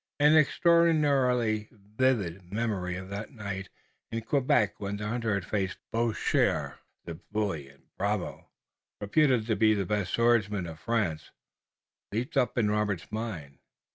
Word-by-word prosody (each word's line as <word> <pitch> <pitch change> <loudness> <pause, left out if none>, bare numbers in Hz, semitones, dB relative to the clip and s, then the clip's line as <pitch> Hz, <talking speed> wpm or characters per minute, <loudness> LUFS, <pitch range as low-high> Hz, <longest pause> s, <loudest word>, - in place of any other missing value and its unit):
An 150 +2 +6
extraordinarily 145 - +3
vivid 100 -5 -1
memory 100 -5 -2
of 95 0 -8
that 100 +2 -5
night 100 -3 -5 0.4
in 115 0 -3
Quebec 125 -6 +1
when 100 0 -3
the 105 0 -4
hunter 115 -2 -1
had 100 -3 -3
faced 95 -2 -2
Boucher, 115 -1 0 0.3
the 85 -1 -7
bully 100 -10 -2
and 70 0 -21 0.2
bravo, 100 0 -2 0.5
reputed 125 +2 +2
the 110 -2 +2
best 100 -1 -1
swordsman 105 -5 +2
of 80 -2 -8
France, 100 -10 -1 0.8
leaped 120 +9 -3
up 125 -2 +1
in 105 -3 +2
Robert's 105 -4 -1
mind. 90 - -5
105 Hz, 130 wpm, -29 LUFS, 100-120 Hz, 0.8 s, An